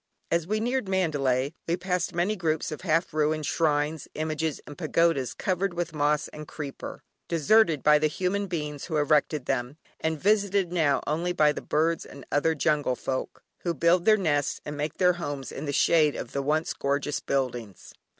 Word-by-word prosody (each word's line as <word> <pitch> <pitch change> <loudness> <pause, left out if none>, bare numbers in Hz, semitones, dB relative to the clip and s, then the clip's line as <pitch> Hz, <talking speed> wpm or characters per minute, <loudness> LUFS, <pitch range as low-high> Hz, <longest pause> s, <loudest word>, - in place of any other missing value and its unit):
As 170 -1 +1
we 215 +2 0
neared 245 -2 -1
Mandalay 145 -7 +1
we 170 +1 +1
passed 180 0 -2
many 180 +5 +1
groups 160 -5 -1
of 155 - -6
half 165 -1 +1
ruined 155 0 +1
shrines, 150 0 0
images 155 0 -2
and 145 - -9
pagodas, 155 -6 +1
covered 185 -1 -1
with 170 -1 -3
moss 150 0 +1
and 150 0 -9
creeper, 145 -4 -7 0.2
deserted 165 -1 +3
by 150 0 +6
the 155 - +3
human 190 +6 -1
beings 150 -5 -4
who 160 -3 -2
erected 150 -1 +2
them, 125 +4 -2 0.2
and 160 -1 -1
visited 200 -2 +2
now 155 -5 +2
only 170 +4 -1
by 150 -3 +4
the - - -5
birds 165 +2 +1
and 140 - -12
other 160 +3 +2
jungle 150 -4 +1
folk, 130 +1 -4 0.2
who 170 -2 -2
build 170 +4 +3
their 215 -1 +6
nests 145 -7 0
and 150 - -5
make 150 +1 -3
their 180 -1 +4
homes 145 -4 -4
in 145 - -6
the 145 - -2
shade 150 +1 +3
of 120 - -6
the 140 - -1
once 155 +3 0
gorgeous 140 +1 -1
buildings. 120 -7 -3
155 Hz, 180 wpm, -27 LUFS, 145-175 Hz, 0.2 s, by